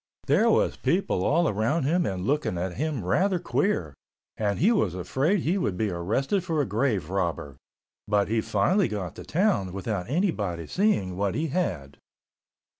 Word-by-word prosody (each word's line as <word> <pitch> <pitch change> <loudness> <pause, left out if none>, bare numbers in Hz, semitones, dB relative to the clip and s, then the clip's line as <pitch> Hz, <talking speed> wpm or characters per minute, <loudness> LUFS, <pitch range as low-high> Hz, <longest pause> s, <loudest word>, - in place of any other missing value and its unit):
There - - +3
was - - +2
people 90 - 0
all 165 - +3
around 115 +9 0
him 170 +6 +1
and 95 -1 -3
looking 145 -7 0
at 90 +1 -3
him 145 - -3
rather 185 - +2
queer, 170 - -1 0.4
and 105 -2 -1
he 205 +7 +4
was 105 - +1
afraid 140 - 0
he 180 +6 0
would 95 - -1
be 105 -1 0
arrested 115 - -1
for 165 -4 -1
a 145 - +2
grave 105 - -1
robber, 85 -7 -2 0.5
but 105 -1 +2
he 110 +1 +1
finally 175 - +2
got 100 -5 -4
to - - -7
town 175 - +1
without 100 0 -3
anybody 105 - -1
seeing 100 - 0
what 100 -1 0
he 160 +1 -1
had. 85 - -2
110 Hz, 170 wpm, -26 LUFS, -, 0.5 s, he